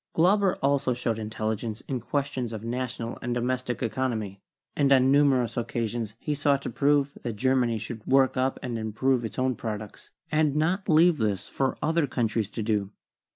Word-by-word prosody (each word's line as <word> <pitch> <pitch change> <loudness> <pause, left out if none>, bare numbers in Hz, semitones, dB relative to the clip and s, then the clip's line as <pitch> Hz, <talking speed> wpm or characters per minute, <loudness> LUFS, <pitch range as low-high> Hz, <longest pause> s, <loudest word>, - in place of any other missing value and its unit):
Glauber 190 +3 +4
78 - - -30
CHEMISTRY - - +5
also 140 -2 +2
showed 115 -2 -1
intelligence 110 +1 -3
in 130 -2 -2
questions 135 -1 -2
of 110 -1 -6
national 120 -1 -3
and 120 0 -2
do - - 0
mestic 125 0 -2
economy, 110 -5 -2 0.3
and 140 -2 +2
on 130 0 +5
numerous 135 -5 +3
occasions 115 -2 -2
he 150 - -2
sought 140 -1 +1
to - - -4
prove 140 +2 +2
that 120 - -3
Germany 125 -1 +2
should 110 0 -7
work 135 0 +4
up 130 +1 0
and 120 -3 -3
improve 120 +4 0
its 115 - -6
own 130 0 +1
products, 105 -2 -6 0.2
and 155 -2 +2
not 175 +6 0
leave 165 0 +5
this 105 -4 -1
for 135 -1 -1
other 160 0 +2
countries 115 -5 -1
to 110 - -4
do. 105 -3 0
125 Hz, 185 wpm, -27 LUFS, 115-140 Hz, 0.3 s, CHEMISTRY